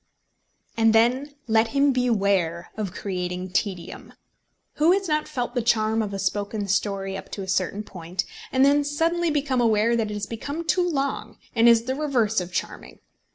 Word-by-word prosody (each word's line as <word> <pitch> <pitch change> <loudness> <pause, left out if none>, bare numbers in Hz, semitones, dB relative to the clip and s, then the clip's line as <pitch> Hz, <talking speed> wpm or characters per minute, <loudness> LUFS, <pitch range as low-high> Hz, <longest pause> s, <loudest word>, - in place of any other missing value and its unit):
And 225 -1 +4
then 255 +6 +2
let 220 0 +3
him 280 0 +5
beware 200 -9 0
of 210 -4 -3
creating 180 -1 -4
tedium! 185 -2 -3 0.6
Who 320 +4 +5
has 390 0 0
not 305 -1 0
felt 245 -1 -3
the 245 - 0
charm 220 -1 +2
of 210 -2 -3
a 200 - -4
spoken 205 +1 -2
story 195 -1 -1
up - - -8
to 200 - -4
a - - -8
certain 190 +2 -1
point, 180 -2 -5 0.3
and 260 +1 +4
then 290 +1 +4
suddenly 330 +4 0
become 280 -4 0
aware 225 0 +3
that 225 -2 0
it - - -4
has 205 0 -3
become 285 +10 -5
too 355 +2 +2
long 280 -3 -2 0.2
and 230 0 +6
is 230 -1 +5
the 260 +2 -2
reverse 250 -8 +1
of 180 0 -7
charming. - - -5
225 Hz, 180 wpm, -24 LUFS, 200-275 Hz, 0.6 s, and